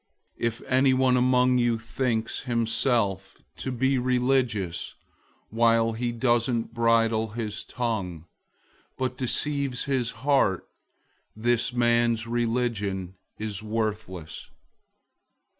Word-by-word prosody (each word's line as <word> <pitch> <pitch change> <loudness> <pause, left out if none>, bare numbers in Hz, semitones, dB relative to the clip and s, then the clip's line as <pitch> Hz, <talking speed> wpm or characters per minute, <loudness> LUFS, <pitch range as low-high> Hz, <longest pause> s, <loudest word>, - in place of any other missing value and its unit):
001:026 - - -1
If 115 -1 -4
anyone 130 -1 +3
among 125 0 +3
you 120 -1 +2
thinks 115 0 -2
himself 115 -5 0 0.2
to 130 - -4
be 130 +2 +1
religious 125 -7 0 0.6
while 115 0 +3
he 120 +1 -2
doesn't 120 -1 0
bridle 115 -2 +2
his 110 -3 -3
tongue, 100 -9 -3 0.7
but 130 -1 -2
deceives 135 0 -1
his 130 -4 0 0.2
heart, 135 -11 +2 0.7
this 120 +2 +1
man's 120 -2 +2
religion 115 -6 -1 0.2
is 105 -1 -4
worthless. 105 -6 -4
115 Hz, 95 wpm, -26 LUFS, 110-125 Hz, 0.7 s, anyone